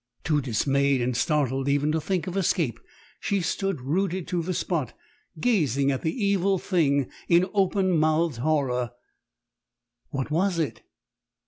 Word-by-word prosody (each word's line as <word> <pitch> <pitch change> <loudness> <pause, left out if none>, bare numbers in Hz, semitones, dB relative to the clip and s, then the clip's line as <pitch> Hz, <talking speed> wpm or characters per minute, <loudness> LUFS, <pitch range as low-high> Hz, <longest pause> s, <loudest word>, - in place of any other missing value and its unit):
"Too 150 -2 +1
dismayed 135 +3 +1
and 125 0 -1
startled 135 -1 +1
even 145 +2 +2
to 160 0 0
think 180 -1 -1
of 180 - -5
escape, 170 - 0 0.4
she 200 - 0
stood 190 -2 -2
rooted 180 +6 -1
to 175 -1 0
the 175 +3 -3
spot, 155 - -2 0.4
gazing 140 - +2
at 135 - -2
the 200 +7 -1
evil 195 -1 +2
thing 145 -8 +1 0.2
in 175 +1 +5
open 190 -2 +2
mouthed 155 -2 +2
horror. 125 -3 0 1.2
What 135 +1 -3
was 180 +3 +1
it? 145 -9 -2
155 Hz, 140 wpm, -26 LUFS, 135-185 Hz, 1.2 s, in